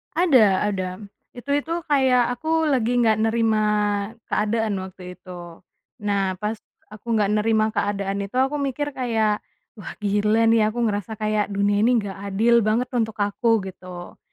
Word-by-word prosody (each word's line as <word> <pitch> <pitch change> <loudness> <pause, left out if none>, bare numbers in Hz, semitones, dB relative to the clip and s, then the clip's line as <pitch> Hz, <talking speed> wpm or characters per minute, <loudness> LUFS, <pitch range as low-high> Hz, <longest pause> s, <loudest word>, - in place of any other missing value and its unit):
Ada 230 - +4
ada, 185 -3 -2 0.4
itu 245 +2 -12
itu 295 +3 -2 0.2
kayak 255 -4 +3
aku 320 +4 0
lagi 245 -3 +1
gak 220 -2 +4
nerima 225 -1 +2 0.7
keadaan 215 0 0
waktu 180 -1 -10
itu, 175 -2 -11 0.4
nah 195 -2 0
pas 210 +3 -4 0.3
aku 225 +2 -3
gak 210 -1 +2
nerima 215 0 +2
keadaan 200 -2 -2
itu 200 +3 -6
aku 270 +3 +1
mikir 280 +1 -2
kayak, 225 -5 0 0.4
"Wah 185 - -8
gila 210 +2 +2
nih 220 -2 +4
aku 235 +2 -2
ngerasa 210 0 -2
kayak 215 0 0
dunia 205 0 +2
ini 240 +4 +3
gak 195 -1 -7
adil 230 +4 +3
banget 225 +4 0
untuk 225 -3 -1
aku," 220 +1 +1
Gitu. 185 -2 -10
215 Hz, 150 wpm, -23 LUFS, 200-240 Hz, 0.7 s, Ada